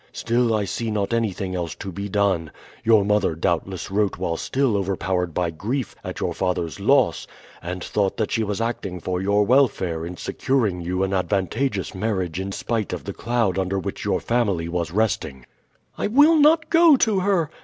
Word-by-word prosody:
Still 115 -1 +1
I 105 -1 0
see 115 +3 -3
not 105 0 -1
anything 100 -5 -1
else 85 -3 -3
to 95 - -7
be 100 +3 -5
done. 95 -5 +1 0.3
Your 110 -3 +4
mother 105 -5 +1
doubtless 85 +3 -2
wrote 100 -1 +1
while 90 -2 -2
still 130 +5 0
overpowered 95 -2 -1
by 85 +1 -1
grief 110 - -3
at - - -6
your - - -1
father's 85 -5 -2
loss, - - +2 0.3
and 90 +1 -5
thought 100 -2 -1
that 110 - -1
she 115 - +1
was 105 -2 -2
acting 105 -6 -3
for 90 +1 -2
your 100 +1 +2
welfare 100 -10 +2
in 90 +1 -6
securing 110 -8 -1
you 90 +2 -1
an 95 0 -1
advantageous 100 +4 -1
marriage 95 -4 -2
in 95 +1 -4
spite 110 0 -2
of - - -5
the - - -5
cloud 115 -6 0
under 95 +1 -1
which 95 - -4
your - - 0
family 100 -9 0
was 85 -1 -2
resting." 80 - -1 0.5
"I - - 0
will 295 +9 +5
not 315 +2 +4
go 330 -2 +7
to 220 -6 +2
her!" 185 -5 +1
100 Hz, 185 wpm, -23 LUFS, 90-115 Hz, 0.5 s, go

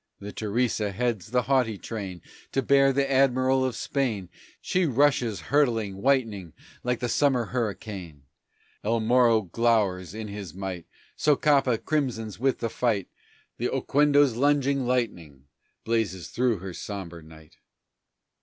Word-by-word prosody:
The 100 +1 -7
Teresa 110 -1 -1
heads 115 -1 -2
the 125 +1 +1
haughty 125 -4 +1
train 95 -5 -6 0.3
To 135 - +1
bear 135 +1 +4
the 135 +1 +1
Admiral 130 -1 +3
of 130 -3 -1
Spain, 110 -11 -2 0.3
She 180 -2 0
rushes, 125 -6 +2
hurtling, 115 -9 +2
whitening, 110 - 0 0.3
like 125 -1 -1
the 125 - 0
summer 125 -1 +2
hurricane; 100 - -5 0.6
El 115 +2 +1
Morro 115 -1 +4
glowers 100 -3 0
in 110 -1 -5
his 100 -5 -7
might; 95 -3 -5 0.3
Socapa 140 -4 +3
crimsons 115 -8 -2
with 135 +1 0
the 115 - -1
fight, 110 -6 0 0.5
The - - 0
Oquendo's 145 -3 +3
lunging 140 0 +2
lightning 85 - -2 0.4
blazes 110 -6 -1
through 120 -3 +1
her 95 0 -7
sombre 85 -4 -7
night. 80 0 -16
115 Hz, 130 wpm, -26 LUFS, 100-130 Hz, 0.6 s, bear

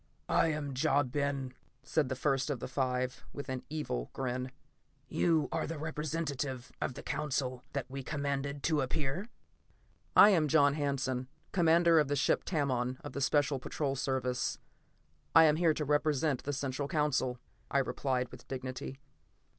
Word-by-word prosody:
"I - - +4
am 150 -3 -2
Ja 135 +2 +3
Ben," 135 0 -2 0.3
said 145 -1 +1
the 130 - -1
first 135 0 +1
of 140 -4 -1
the - - -4
five, 130 -1 -1
with 140 - -6
an 130 -1 -2
evil 145 - -3
grin. 130 -1 -3 0.6
"You 160 0 +2
are - - -1
the 165 0 -4
representative 150 -4 -3
of 125 - -2
the - - -8
Council 130 -4 -2
that 140 -3 -2
we 135 +1 -5
commanded 140 0 -2
to 155 -3 +2
appear?" 145 - -2 0.9
"I 210 - +9
am 160 -6 +3
John 145 -1 +5
Hanson, 135 -3 -1 0.2
commander 170 -2 +5
of 150 - +2
the 145 - 0
ship 135 - +2
Tamon 130 -6 0
of - - -7
the 140 - -3
Special 140 0 +2
Patrol 135 +2 -2
Service. 125 -2 -1 0.8
I 165 - +10
am 155 -1 +5
here 165 -2 +3
to 150 - -2
represent 150 -1 +1
the 145 - -1
Central 140 0 -2
Council," 140 -5 +1 0.3
I - - +1
replied 130 -1 0
with - - -12
dignity. 130 0 -5
140 Hz, 160 wpm, -32 LUFS, 130-150 Hz, 0.9 s, I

